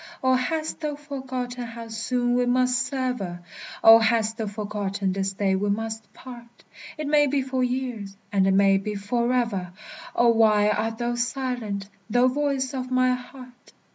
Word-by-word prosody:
Oh, 260 0 +4
hast 310 +5 -1
thou 300 -2 -3
forgotten 260 -4 -5
how 230 0 -8
soon 245 +2 -1
we 245 0 +2
must 250 0 +2
sever? 250 -10 -3 0.4
Oh! 225 0 +10
hast 225 0 +1
thou 220 -2 -3
forgotten 205 -2 -3
this 195 0 -2
day 190 -1 +1
we 205 +2 -1
must 220 +1 -3
part? 240 -2 -13 0.3
It 305 - -4
may 295 0 +4
be 275 0 0
for 260 -1 -1
years, 245 -6 -3
and 195 -2 +3
it 195 - +3
may 195 0 +4
be 210 +2 -4
forever! 230 -3 -1 0.4
Oh, 240 0 +4
why 215 -2 +4
art 225 +1 -1
thou 240 +1 -1
silent, 240 -5 -3 0.2
thou 245 +3 +4
voice 275 -1 -1
of 255 -1 -4
my 255 0 +3
heart? 250 0 -10
240 Hz, 165 wpm, -25 LUFS, 210-255 Hz, 0.4 s, Oh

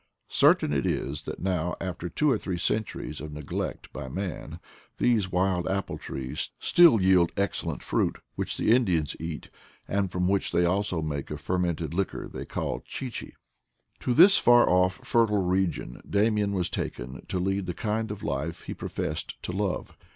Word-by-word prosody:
Certain 75 - +4
it 70 -3 +1
is 75 +2 -2
that - - -5
now, 90 -2 0
after 90 -2 -4
two 150 - +2
or - - +4
three 95 -3 -3
centuries 105 -4 -2
of 75 0 -6
neglect 75 -1 -5
by 65 - -6
man, 95 +3 -5 0.4
these 110 -6 +2
wild 90 -1 +1
apple 100 +1 -2
trees 65 -1 -4
still 170 -10 +6
yield 95 -2 +4
excellent 100 0 -2
fruit, - - 0 0.2
which - - -3
the - - +2
Indians 90 - +2
eat, 80 -2 -6 0.4
and 100 -2 0
from 90 0 0
which 100 +1 +1
they 85 - +3
also 90 -2 0
make 70 -2 -3
a - - -4
fermented 85 -4 -1
liquor 95 +2 -2
they - - -7
oaXLchi 130 -3 -4
chi. - - -17 0.7
To 125 - 0
this 190 +7 +8
far 120 0 +6
off 90 0 +2
fertile 105 -4 +3
region 90 -8 -1
Damian 105 0 +2
was 90 -3 0
taken 65 0 -5
to - - -2
lead 95 +1 -1
the 90 - -3
kind 110 +1 -1
of 105 -1 -6
life 80 +4 -3
he - - -5
professed - - -4
to - - -3
love. 95 0 -2
95 Hz, 170 wpm, -27 LUFS, 85-105 Hz, 0.7 s, this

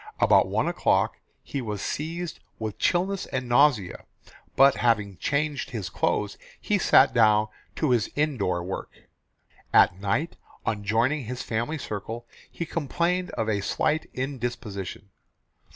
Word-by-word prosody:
About - - +5
one - - 0
o'clock - - +1 0.2
he 140 - -4
was 105 -4 -4
seized 165 +3 -4 0.2
with 110 -2 -5
chilliness 185 +2 +1
and 130 -1 -3
nausea, 120 -6 +3 0.5
but 135 0 +6
having 105 -5 +1
changed 145 0 -1
his 110 -7 -5
clothes - - -1 0.2
he - - 0
sat - - +5
down 110 -1 +4 0.3
to 155 -5 +1
his 120 -4 +2
indoor 110 - 0
work. 95 - -5 0.8
At 90 - +5
night, 105 +12 -1 0.3
on 105 -2 -1
joining 120 +7 +1
his 125 +2 -5
family 120 +8 -2
circle, 115 -1 -5 0.2
he 170 - -5
complained 170 +4 -1
of 110 - 0
a 105 -2 0
slight 155 +9 0
indisposition. 120 -7 -5
120 Hz, 135 wpm, -26 LUFS, 105-150 Hz, 0.8 s, but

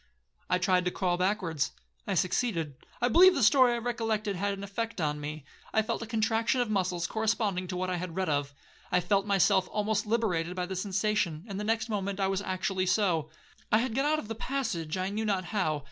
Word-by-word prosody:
'I 180 - +3
tried 180 0 +2
to - - +2
crawl 180 -1 0
backwards,—I 180 0 -2
succeeded. 175 - 0 0.3
I - - +5
believe 360 +9 +7
the 275 - +1
story 255 +1 +6
I - - 0
recollected 225 -3 -1
had 200 +3 -1
an 195 - -7
effect 225 +2 -4
on 150 -2 -1
me, 150 0 -6 0.3
I 220 - +4
felt 230 +1 -2
a 230 - -5
contraction 225 +2 +1
of 240 -3 0
muscles 180 -4 0
corresponding 215 -3 0
to 180 0 -4
what 185 0 -1
I 180 - -1
had 175 -1 -5
read 190 0 -1
of. 145 -2 -1 0.4
I 180 - +4
felt 195 +3 +1
myself 195 -1 +3
almost 210 0 0
liberated 180 -7 0
by 180 -1 -1
the 190 +1 -5
sensation, 195 -3 -1
and 200 -2 -5
the - - -3
next 220 +1 0
moment 200 -2 -2
I 190 -1 +1
was 195 0 0
actually 185 -1 -1
so;—I 170 0 0
had 235 +1 -1
got 270 +4 +1
out 310 +1 +2
of 265 - -5
the 225 - -3
passage 220 - -3
I 185 +1 -1
knew 215 +2 -2
not 195 -4 0
how. 175 -7 0
195 Hz, 210 wpm, -29 LUFS, 180-220 Hz, 0.4 s, believe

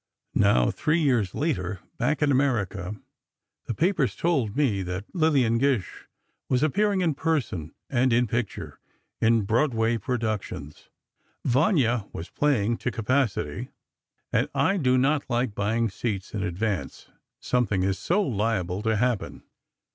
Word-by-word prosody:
Now, - - +4
three 155 +3 +1
years 125 - +1
later, 100 - -1 0.2
back 145 +5 +1
in 145 - +3
America, 110 -8 0 0.7
the 115 - -3
papers 165 - +1
told 135 -10 0
me 120 -10 +2
that 90 +2 -4
Lillian 140 -9 +3
Gish 130 -8 -1 0.4
was 130 +2 +2
appearing 200 +5 +2
in 165 -4 +2
person 130 - -2
and 130 -1 +2
in 120 +1 +4
picture, 115 -1 -4 0.4
in 115 -1 +4
Broadway 115 0 +1
productions. 110 - -4 0.6
"Vanya" 125 - +2
was 80 - -7
playing 120 -6 +1
to - - -2
capacity, 125 -1 -1 0.6
and - - +2
I 195 - +2
do 130 -6 +3
not 140 +3 +1
like 120 -2 0
buying 110 +3 0
seats 95 -1 -4
in 105 - -2
advance—something 100 - -2
is 95 -1 0
so 200 +4 +1
liable 105 - -1
to 110 0 +1
happen. 120 -2 -1
120 Hz, 130 wpm, -26 LUFS, 100-140 Hz, 0.7 s, Now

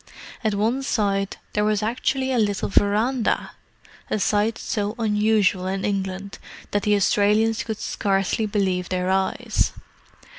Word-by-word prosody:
At 215 -2 +1
one 225 +6 +1
side 200 -6 0 0.2
there 210 - +1
was 210 0 +1
actually 260 +4 0
a 250 - +2
little 205 -2 0
verandah! 215 +5 +1 0.6
a - - 0
sight 210 +2 +1
so 210 -3 -2
unusual 210 -4 +2
in 195 +1 -2
England 195 -1 -3 0.3
that 205 - +1
the 210 0 +2
Australians 210 +3 +2
could 220 -2 -4
scarcely 195 +2 0
believe 190 -3 0
their 185 0 0
eyes. 190 0 0
205 Hz, 135 wpm, -23 LUFS, 195-220 Hz, 0.6 s, a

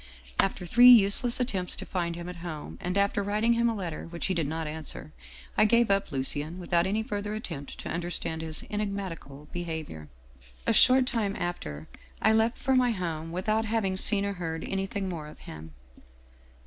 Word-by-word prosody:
" - - -20
After 180 - -9
three 240 +7 +7
useless 235 +1 +6
attempts 195 -8 0
to - - -7
find 170 -2 -2
him 170 0 -7
at 180 -1 -7
home, 165 -3 -7
and 180 +2 -2
after 200 0 +2
writing 210 +4 +1
him 235 0 +2
a 230 - -1
letter 175 -7 -5
which 170 0 -4
he 190 - 0
did 165 -5 0
not 160 +2 -3
answer, 155 0 -5 0.4
I - - +5
gave 235 0 +4
up 195 -3 +1
Lucien 145 +4 +1
without 175 -1 +1
any 215 +3 0
further 210 0 -4
attempt 165 -10 -6
to - - -7
understand 170 -1 -3
his 160 -1 -3
enigmatical 190 -9 -5
behavior. 160 - -5 0.6
A - - +3
short 255 +3 +6
time 220 -5 0
after, 80 - -5 0.3
I 220 - +4
left 225 +2 +2
for 265 0 +1
my 250 -1 +4
home 165 -6 -3
without 215 +5 0
having 215 -4 0
seen 200 +1 +3
or 200 - -2
heard 165 -3 -4
anything 195 0 -3
more 165 -5 -5
of 150 - -13
him. 80 0 -10
185 Hz, 185 wpm, -28 LUFS, 160-215 Hz, 0.6 s, three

